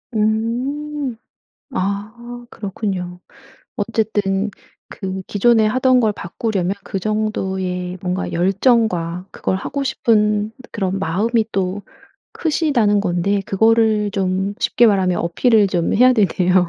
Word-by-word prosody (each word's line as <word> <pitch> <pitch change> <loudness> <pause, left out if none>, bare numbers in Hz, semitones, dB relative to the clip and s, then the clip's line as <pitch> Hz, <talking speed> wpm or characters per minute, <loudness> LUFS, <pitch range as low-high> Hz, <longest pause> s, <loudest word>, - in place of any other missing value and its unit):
음. 250 +6 -1 0.6
아 235 +5 -4
그렇군요. 190 -3 -4 0.6
어쨌든 205 -2 0 0.4
그 190 -1 -5
기존에 220 +2 +3
하던 255 +3 +3
걸 220 -3 +2
바꾸려면 195 0 -2
그 195 - -4
정도의 190 -3 -2
뭔가 185 0 -2
열정과 185 -2 +1
그걸 - - -2
하고 280 +8 -3
싶은 215 -5 +1 0.2
그런 195 -2 -2
마음이 215 +6 +1
또 190 0 -1 0.5
크시다는 275 -11 +1
건데 195 +1 0
그거를 220 0 +3
좀 190 0 -1
쉽게 240 - +3
말하면 190 -4 +2
어필을 210 +5 +3
좀 175 -3 0
해야 250 +3 +6
되네요. 185 -4 +2
205 Hz, 235 characters per minute, -19 LUFS, 190-230 Hz, 0.6 s, 해야